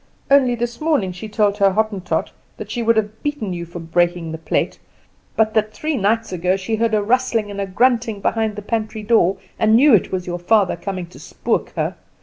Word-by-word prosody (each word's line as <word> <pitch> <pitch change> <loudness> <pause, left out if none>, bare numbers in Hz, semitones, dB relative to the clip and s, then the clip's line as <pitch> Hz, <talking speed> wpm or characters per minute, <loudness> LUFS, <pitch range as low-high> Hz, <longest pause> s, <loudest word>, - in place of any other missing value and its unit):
Only 260 -3 +5
this 240 +2 -4
morning 295 - +1
she 185 +5 -8
told 210 -1 +1
her 195 -1 +4
Hottentot 210 -3 -1 0.3
that - - -8
she 240 - -2
would 230 0 +3
have 215 0 -2
beaten 290 -10 -3
you 170 -1 -5
for 175 - -9
breaking 170 0 0
the 160 - -6
plate, 160 - -1 0.6
but 220 -1 +2
that 215 -1 +1
three 310 +4 -2
nights 225 0 0
ago 180 +2 +1
she 205 +4 -2
heard 225 0 +1
a 210 - +1
rustling 230 -2 +1
and 200 0 -4
a 195 - -2
grunting 230 +1 +1
behind 220 +1 0
the 210 - -7
pantry 215 0 -3
door, 205 -4 +3 0.2
and 220 0 +4
knew 275 +3 +6
it 205 - +3
was 185 -1 -2
your 175 0 -4
father 195 +1 +2
coming 185 +1 -5
to 170 - -15
spook - - -2
her. - - -2
215 Hz, 210 wpm, -20 LUFS, 185-230 Hz, 0.6 s, knew